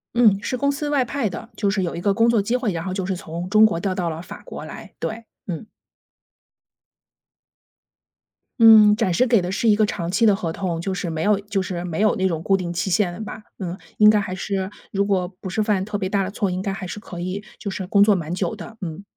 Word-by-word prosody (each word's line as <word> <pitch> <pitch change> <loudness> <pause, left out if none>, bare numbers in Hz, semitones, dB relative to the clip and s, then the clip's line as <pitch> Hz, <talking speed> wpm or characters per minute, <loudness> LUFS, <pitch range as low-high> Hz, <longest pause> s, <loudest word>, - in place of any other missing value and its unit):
嗯， 220 -5 +5
是 255 - -1
公 280 +2 +1
司 290 +1 -3
外 280 -3 +2
派 245 -2 -2
的， 225 +5 -7
就 200 -2 +1
是 195 -2 0
有 170 -2 -2
一 170 - -5
个 200 0 +2
工 230 +3 +3
作 235 -2 +3
机 230 +5 0
会， 245 -5 0
然 165 -1 -3
后 185 +1 -3
就 190 -1 -2
是 190 +1 -2
从 175 +1 -6
中 215 +1 +6
国 190 -6 +1
调 185 0 -2
到 175 -2 -1
了 160 +1 -6
法 180 - -10
国 - - -8
来， - - -10
对， 225 +1 -4 0.2
嗯。 175 +1 -4 2.9
嗯， 215 -2 +8
暂时 220 +1 +2
给 230 -6 +3
的 180 +1 -3
是 225 +4 0
一 210 - +6
个 215 - +2
长 170 -3 -3
期 225 +3 +3
的 200 - +5
合 165 -5 -3
同， 175 -4 -3
就 190 +3 -2
是 180 -2 -3
没 160 0 -2
有 205 -1 +3
就 200 -1 -2
是 175 -2 -4
没 170 +3 -3
有 215 - +3
那 190 -3 +1
种 165 -2 -3
固 195 - +3
定 180 -2 -2
期 175 +2 -2
限 190 -2 +2
的 175 - -9
吧， 215 0 -7 0.2
嗯， 180 -3 -4 0.2
应 210 0 +7
该 210 - +3
还 185 -2 -4
是 190 -1 -2 0.2
如 200 0 +1
果 185 -3 +1
不 190 - -5
是 215 +4 0
犯 205 -3 +1
特 205 +1 -3
别 190 -2 -2
大 195 0 +1
的 185 - -3
错， 200 -1 -1
应 185 - -2
该 195 - -2
还 195 -1 -5
是 185 - -6
可 180 -5 -9
以 185 +3 -4 0.2
就 200 - -4
是 190 -1 -5
工 200 +1 +5
作 205 -1 +5
蛮 165 -2 -3
久 180 -2 -2
的， 225 -1 -10
嗯。 175 +2 -5
195 Hz, 280 characters per minute, -22 LUFS, 180-215 Hz, 2.9 s, 嗯